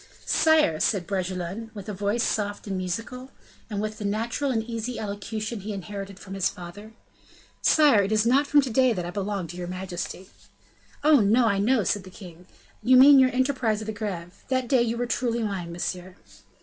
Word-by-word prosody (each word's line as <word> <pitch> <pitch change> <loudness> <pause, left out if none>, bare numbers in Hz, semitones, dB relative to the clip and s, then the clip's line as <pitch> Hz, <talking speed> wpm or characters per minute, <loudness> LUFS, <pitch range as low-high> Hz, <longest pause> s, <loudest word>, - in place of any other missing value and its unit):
"Sire," 310 - +3
said 195 -5 +1
Bragelonne, 185 +3 -4
with 200 - -8
voice 205 +2 -1
soft 205 -1 -2
and 195 -2 -3
musical, 225 +8 -5 0.4
and 205 -2 -3
with 215 +1 -4
the - - -5
natural 225 +7 -1
and 225 -4 0
easy 235 +1 -4
elocution 215 +2 -4
he 210 +2 -5
inherited 195 0 -7
from 195 0 -10
his 195 -2 +1
father; 205 +5 -10 0.7
"Sire, 290 -9 +5
it 200 +1 -2
is 215 0 +2
not 275 +5 +3
from 290 0 +5
to 260 -3 -4
day 255 +1 +3
that 180 -4 -4
I 175 - -5
belong 200 -1 -3
to 175 - -8
your 175 -1 -5
majesty." 185 +1 -6 0.7
"Oh! 300 -2 +6
no, 225 +4 +4
I 200 -3 +2
know," 225 +2 +2
said 200 +2 -1
the 185 - -11
king, 180 -2 -13 0.3
"you 255 +1 +5
mean 275 +1 +9
your 260 -1 +5
enterprise 255 -4 0
of 220 - -6
the 220 - -4
Greve. 195 -4 -6
That 255 -1 0
day, 255 0 +3
you 235 0 -1
were 245 - -1
truly 235 -1 -1
mine, 190 -5 -4
monsieur." 180 +1 -5
210 Hz, 195 wpm, -25 LUFS, 190-240 Hz, 0.7 s, mean